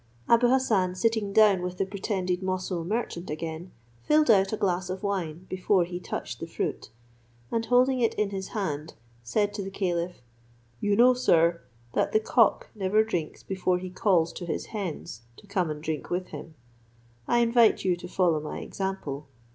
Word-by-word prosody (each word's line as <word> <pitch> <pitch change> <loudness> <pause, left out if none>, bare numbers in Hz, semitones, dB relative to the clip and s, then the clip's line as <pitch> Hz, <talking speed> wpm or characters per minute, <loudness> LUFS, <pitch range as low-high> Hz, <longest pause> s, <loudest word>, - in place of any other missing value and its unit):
Abou 235 +1 +5
Hassan 220 -8 +2
sitting 220 0 0
down 205 -3 +5
with 180 0 -4
the 195 - 0
pretended 190 -2 -2
Moussul 185 -2 -2
merchant 185 -2 -3
again, 160 +3 -5 0.3
filled 300 -4 +4
out 195 -2 +4
a 215 - -1
glass 185 -2 0
of 185 +2 -5
wine 180 -4 -3
before 185 0 +2
he 175 +1 -5
touched - - -5
the - - -5
fruit; - - -4 0.6
and 230 - 0
holding 255 +1 +4
it 230 -2 +1
in 210 -1 0
his 190 -1 -4
hand, 155 -7 -4 0.3
said 205 - 0
to 205 - -4
the 195 - -5
caliph, 180 -2 -2 0.6
"You 205 0 +1
know, 245 +3 +6
sir, 170 -8 +3 0.3
that - - 0
the 215 - +5
cock 225 +1 +2
never 210 +1 +2
drinks 175 -8 -4
before 185 -1 0
he 185 0 -6
calls 175 -4 +2
to 175 - -7
his 160 - -3
hens 180 - -5 0.2
to - - -15
come 190 -4 -1
and 150 0 -5
drink 155 -2 -3
with 180 +1 -2
him; 160 - -9 0.7
I 240 - +3
invite 230 -3 +4
you 180 -2 +3
to - - -8
follow 175 -4 +2
my 150 - -6
example. 175 -8 -4
190 Hz, 180 wpm, -27 LUFS, 175-215 Hz, 0.7 s, know